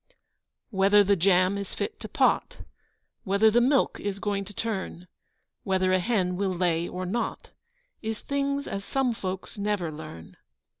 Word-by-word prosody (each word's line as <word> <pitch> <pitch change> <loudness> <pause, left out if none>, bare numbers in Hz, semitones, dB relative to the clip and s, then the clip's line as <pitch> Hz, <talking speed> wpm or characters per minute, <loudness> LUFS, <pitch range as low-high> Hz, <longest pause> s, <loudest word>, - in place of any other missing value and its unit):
Whether 200 +1 +5
the 200 +1 +3
jam 185 +2 +3
is 200 - -6
fit 425 - -4
to - - -7
pot, - - +1 0.6
Whether 200 +2 +4
the 240 +2 +4
milk 270 +3 +2
is 200 -1 -3
going 200 -1 -2
to 200 - -10
turn, 190 -5 -4 0.5
Whether 185 -1 +1
a 185 - +4
hen 185 -3 0
will 190 -1 0
lay 170 -1 +1
or 185 +1 -5
not, 225 +7 -3 0.5
Is 220 -1 -3
things 280 0 -1
as 195 - -4
some 265 +2 0
folks 190 -2 -5
never 200 -5 -1
learn. 150 - -10
200 Hz, 155 wpm, -27 LUFS, 185-220 Hz, 0.6 s, Whether